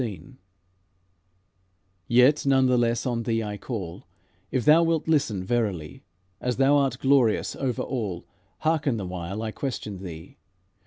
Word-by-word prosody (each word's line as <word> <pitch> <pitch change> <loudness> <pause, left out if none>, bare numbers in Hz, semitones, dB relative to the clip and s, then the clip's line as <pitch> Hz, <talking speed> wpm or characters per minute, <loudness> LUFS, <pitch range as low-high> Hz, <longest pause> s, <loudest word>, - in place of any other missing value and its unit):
XVI 110 +1 -7 1.7
Yet, 125 +5 +4
none 135 -1 +4
the 125 -1 +3
less, 120 -1 +1
on 120 -2 -1
thee 115 -1 -1
I 105 -1 -5
call, 95 -5 -6 0.4
If 130 - -1
thou 155 +2 +7
wilt 165 -1 0
listen 135 -12 +1
verily, 95 - -2 0.4
As 125 -1 -2
thou 135 +2 +4
art 135 -3 +1
glorious 130 -5 +2
over 130 -4 -2
all, 105 -9 -4 0.4
Hearken 155 -6 +1
the 100 - -4
while 90 +4 -5
I 110 - -3
question 110 -7 -5
thee. 85 -2 -10
120 Hz, 145 wpm, -25 LUFS, 100-135 Hz, 1.7 s, thou